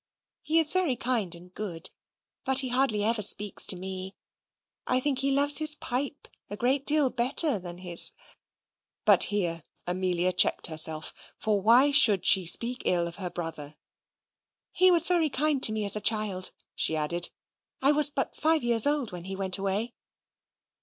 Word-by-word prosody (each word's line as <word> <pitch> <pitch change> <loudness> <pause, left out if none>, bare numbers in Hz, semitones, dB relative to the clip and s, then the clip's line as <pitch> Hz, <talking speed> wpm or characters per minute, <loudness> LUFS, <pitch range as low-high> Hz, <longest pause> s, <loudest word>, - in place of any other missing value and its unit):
He 320 - -2
is 320 -2 +2
very 365 -8 -1
kind 230 -8 -3
and 180 +2 -16
good, 180 -6 -7 0.5
but 265 -1 0
he 260 -2 -6
scarcely 250 -5 -1
ever 225 0 -1
speaks 205 0 +3
to - - +1
me; 190 +1 -7 0.7
I 255 - +2
think 270 0 -2
he 275 +1 0
loves 285 +2 +2
his 305 -1 +5
pipe 275 +3 -6 0.2
a 205 - -8
great 265 +4 -1
deal 295 -3 +4
better 255 - +1
than 175 -1 -9
his" 175 -2 +3 1.0
but - - +6
here 175 -5 -3 0.2
Amelia 180 0 -2
checked 180 - +2
herself, 155 -1 +3 0.2
for 210 -2 -2
why 245 +7 +3
should 220 -10 +4
she 185 -3 +3
speak 240 +7 +3
ill 175 -1 -1
of 170 +2 -8
her 185 -3 -6
brother? 160 -4 -8 1.0
"He 370 0 +3
was 340 -2 +4
very 340 -3 0
kind 290 0 -2
to 220 - +5
me 215 -1 -4
as 200 - +1
a 210 - -4
child," 205 -4 -1 0.2
she 160 - 0
added; 170 +3 -2 0.5
"I 275 +2 +2
was 295 -1 +4
but 280 -2 -5
five 315 -2 -1
years 235 0 +2
old 290 -5 -2
when 175 -1 -10
he 190 0 -6
went 190 0 -1
away." 200 +5 -4
215 Hz, 175 wpm, -25 LUFS, 185-275 Hz, 1.0 s, but